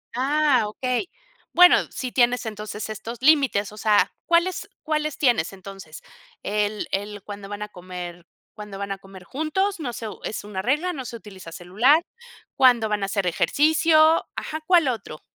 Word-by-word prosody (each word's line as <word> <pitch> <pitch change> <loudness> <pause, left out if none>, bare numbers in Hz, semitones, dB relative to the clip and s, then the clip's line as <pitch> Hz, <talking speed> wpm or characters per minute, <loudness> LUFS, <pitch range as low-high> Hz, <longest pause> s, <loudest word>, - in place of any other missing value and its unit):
Ah, 275 -1 +2
okey. 250 - -2 0.4
Bueno, 360 0 +8
sí 255 -2 -5
tienes 245 0 +2
entonces 215 0 -6
estos 225 +2 -7
límites, 270 -9 +3
o 210 - -13
sea, 210 -1 +3
¿cuáles 355 +3 +1
cuáles 305 -1 -1
tienes 240 - +1
entonces? 195 -4 -11 0.4
El 210 0 -1
el 205 +1 -3
cuando 205 -1 -8
van 205 0 -6
a 210 - -5
comer 180 -2 -8 0.3
cuando 210 -2 -9
van 200 0 -5
a 195 - -3
comer 195 -1 -14
juntos, 315 - -2
no 255 -6 -4
sé 225 - -6
u - - -10
es 215 - -4
una 205 -2 -5
regla, 300 - 0
no 265 -5 -6
se 235 - -7
utiliza 190 -6 -11
celular, 220 - +3 0.5
cuándo 245 -4 +4
van 210 -1 -1
a - - +1
hacer 195 -1 -1
ejercicio, 310 - +3
ajá, 315 - -4
¿cuál 345 -5 +4
otro? 210 -11 -5
220 Hz, 170 wpm, -23 LUFS, 200-300 Hz, 0.5 s, Bueno